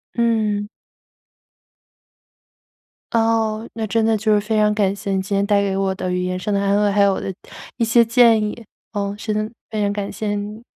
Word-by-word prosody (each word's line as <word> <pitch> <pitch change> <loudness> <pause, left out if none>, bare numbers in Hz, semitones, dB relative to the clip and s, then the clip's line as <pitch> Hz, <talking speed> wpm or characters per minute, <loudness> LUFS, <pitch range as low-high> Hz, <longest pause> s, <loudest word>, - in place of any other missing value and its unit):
嗯。 215 -3 +1 2.4
哦。 225 -1 +1
那 225 -1 -3
真 225 +2 +1
的 225 0 +3
就 215 +1 +1
是 210 - +4
非 215 +1 -1
常 210 0 +3
感 200 -2 +1
谢 200 0 -5
你 190 -1 +1
今 200 +1 -3
天 200 0 +2
带 205 -1 +3
给 195 -1 -1
我 195 0 0
的 185 -1 -3
语 180 0 -1
言 185 0 -2
上 205 +3 -3
的 200 - +2
安 200 +1 +2
慰， 205 - +2
还 200 +1 +2
有 200 -1 +4
我 - - -3
的 190 - -4 0.4
一 235 - +1
些 235 +1 +5
建 230 -1 +5
议， 210 +2 -4 0.3
嗯， 200 -1 -3
是 215 0 -3
真 215 0 0
的 225 - -17 0.2
非 215 -1 -2
常 200 0 +1
感 205 -1 -4
谢 205 +1 -3
你。 210 +2 -6
210 Hz, 230 characters per minute, -20 LUFS, 200-220 Hz, 2.4 s, 些